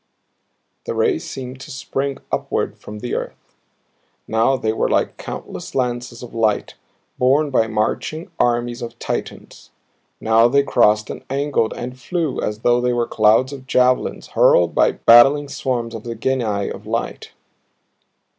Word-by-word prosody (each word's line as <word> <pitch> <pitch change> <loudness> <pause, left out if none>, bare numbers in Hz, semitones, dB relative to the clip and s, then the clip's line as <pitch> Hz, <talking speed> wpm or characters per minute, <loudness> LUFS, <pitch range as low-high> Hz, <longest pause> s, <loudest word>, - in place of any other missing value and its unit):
The - - -2
rays 395 -8 0
seemed 130 -1 -7
to 155 - -10
spring 135 0 -3
upward - - -2
from 105 0 -9
the 125 - -4
earth. - - -6 0.7
Now 115 +4 +2
they 110 -3 -1
were - - 0
like - - +1
countless - - -8
lances 120 -2 -2
of 120 - -10
light 110 -2 0 0.5
borne 140 +4 +3
by 115 -4 +2
marching 110 +9 -2
armies 120 0 0
of 120 -1 -7
Titans; - - -6 0.5
now 115 +1 +4
they 140 +3 +3
crossed 105 -5 +2
and - - -8
angled 135 -4 0
and 125 +1 -7
flew 165 +1 -2
as 105 +1 -3
though 120 0 +3
they 125 0 +1
were 120 -1 +1
clouds 110 +6 +3
of 130 -2 -10
javelins 125 -1 +1
hurled 85 -1 +4
by - - +3
battling 135 +5 +6
swarms 120 -4 -3
of 115 -2 -7
the 115 -1 -5
Genii 110 -5 -1
of - - -9
Light. - - -4
120 Hz, 150 wpm, -20 LUFS, 115-135 Hz, 0.7 s, battling